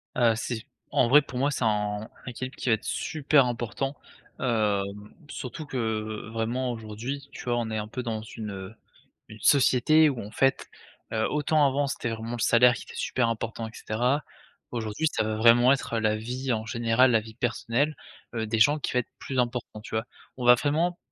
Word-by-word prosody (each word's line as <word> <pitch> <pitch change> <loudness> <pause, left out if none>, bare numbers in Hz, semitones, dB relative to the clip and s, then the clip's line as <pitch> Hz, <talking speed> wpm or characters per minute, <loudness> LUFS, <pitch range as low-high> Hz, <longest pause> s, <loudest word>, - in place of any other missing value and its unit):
Heu, 120 -2 +4
c'est 115 0 -4 0.3
en - - +3
vrai 145 +5 +7
pour 125 -3 -8
moi 140 +2 +2
c'est 130 - -2
un 105 -1 0 0.2
équilibre 130 +1 -6
qui - - -3
va - - +6
être 110 - -1
super 145 -2 +2
important, 125 +3 -3 0.4
hem, 105 -3 -1 0.2
surtout 150 +4 -6
que, 110 -5 -3
vraiment 120 +3 -1
aujourd'hui 120 +5 -6
tu - - -9
vois, 120 -1 0
on 115 -2 -2
est 110 - -2
un 105 0 -3
peu 125 +4 -5
dans 115 -3 -3
une, 110 -1 -7
heu, 95 +2 -8 0.5
une 110 - -12
société 145 +4 +5
où 130 -4 -4
en 105 - -9
fait, 135 +3 +1 0.5
heu, 110 0 +1
autant 150 0 +2
avant 140 +2 +1
c'était 120 - -3
vraiment 115 +1 -5
le 120 - -4
salaire 120 +1 +6
qui - - -7
était - - -12
super 120 -2 0
important 115 0 -3
et - - -11
cetera, 125 +8 0 0.5
aujourd'hui 115 +6 -1
ça - - +1
va 110 0 -2
vraiment 120 +3 +6
être 125 -4 0
la 110 -1 +2
vie 125 +4 -3
en 110 -1 -2
général, 115 +3 +3
la 115 - +4
vie 110 0 -11
personnelle, 125 +5 0 0.4
heu, 110 -1 -2
des 110 0 0
gens 145 +7 +5
qui - - -3
va 125 - +3
être 125 - -5
plus 135 - -5
important 120 -3 -2
tu - - -11
vois? 110 - -1 0.3
On 125 - -4
va 125 - +9
vraiment 160 +6 0
120 Hz, 200 wpm, -27 LUFS, 110-130 Hz, 0.5 s, va